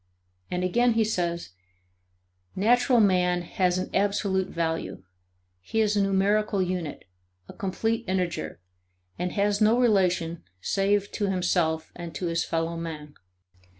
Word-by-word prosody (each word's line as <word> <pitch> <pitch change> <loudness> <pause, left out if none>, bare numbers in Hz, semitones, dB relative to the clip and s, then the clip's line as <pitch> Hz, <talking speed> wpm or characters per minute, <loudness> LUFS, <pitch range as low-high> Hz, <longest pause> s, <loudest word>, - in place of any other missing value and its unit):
And 180 0 -2
again 240 +6 +3
he 225 0 +3
says: 175 -5 -2 1.1
"Natural 240 +5 +4
man 180 -3 +3
has 180 +1 0
an 185 - -3
absolute 195 -1 +1
value; 165 - -3 0.6
he 225 - -2
is 215 -1 +2
a 205 - +3
numerical 200 +2 +2
unit, 180 -5 -3 0.4
a - - -10
complete 225 +3 -2
integer 180 - -2 0.6
and 180 0 -2
has 205 +1 +1
no 220 +3 +4
relation 180 -8 +2 0.2
save 200 - +1
to 205 - -1
himself 175 -4 0
and 170 -2 -8
to 185 - -3
his 165 -1 0
fellow 165 0 -2
man. 155 -3 -6
185 Hz, 130 wpm, -26 LUFS, 170-205 Hz, 1.1 s, Natural